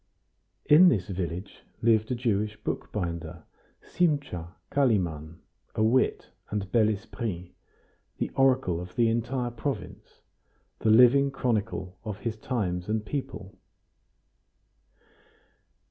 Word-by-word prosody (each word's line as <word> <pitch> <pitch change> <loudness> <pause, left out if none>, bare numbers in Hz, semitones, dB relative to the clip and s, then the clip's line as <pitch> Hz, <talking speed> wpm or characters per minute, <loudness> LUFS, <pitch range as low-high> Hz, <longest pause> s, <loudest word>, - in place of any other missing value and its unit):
In 175 +5 +8
this 100 - 0
village 90 0 -5 0.2
lived 110 -1 +3
a 125 - 0
Jewish 105 -3 -1
bookbinder, 85 -4 -4 0.4
Simcha 140 - -1 0.2
Kalimann, 85 - 0 0.4
a 110 - +1
wit 120 +4 +1 0.2
and 100 -2 -3
bel 110 -3 +4
esprit, 100 -3 -4 0.7
the - - -2
oracle 130 -10 +2
of 90 0 -10
the 115 -1 +3
entire 120 +2 -1
province, 120 0 -6 0.6
the 110 - +1
living 125 +5 +6
chronicle 110 -8 -2
of 105 -4 -5
his 115 -2 -2
times 100 -6 -3
and 110 0 -1
people. 130 -7 -6
110 Hz, 105 wpm, -27 LUFS, 95-125 Hz, 0.7 s, In